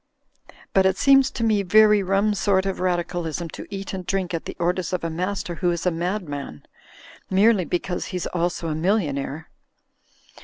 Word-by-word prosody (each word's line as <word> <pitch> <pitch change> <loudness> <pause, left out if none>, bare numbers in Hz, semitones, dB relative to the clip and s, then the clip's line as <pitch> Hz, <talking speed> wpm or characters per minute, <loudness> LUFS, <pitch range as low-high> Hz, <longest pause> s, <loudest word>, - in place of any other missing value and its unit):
But 190 -1 +5
it 190 0 0
seems 270 +1 +5
to 230 - -5
me 215 -3 +3
very 210 +2 +5
rum 195 +2 +1
sort 195 -1 +1
of 195 -1 -2
Radicalism 175 -2 -2
to - - -9
eat 195 -1 -6
and 185 -1 -4
drink 185 -1 -2
at 165 - -3
the - - -7
orders 180 +1 -1
of 180 - -2
a 165 - -2
master 180 +2 -3
who 175 +1 0
is 170 0 -2
a 180 - +3
madman, 165 - -4 0.7
merely 195 0 +4
because 175 +1 -2
he's 180 -2 -4
also 175 -1 -2
a - - -1
millionaire. 155 -4 -1
180 Hz, 175 wpm, -23 LUFS, 170-195 Hz, 0.7 s, But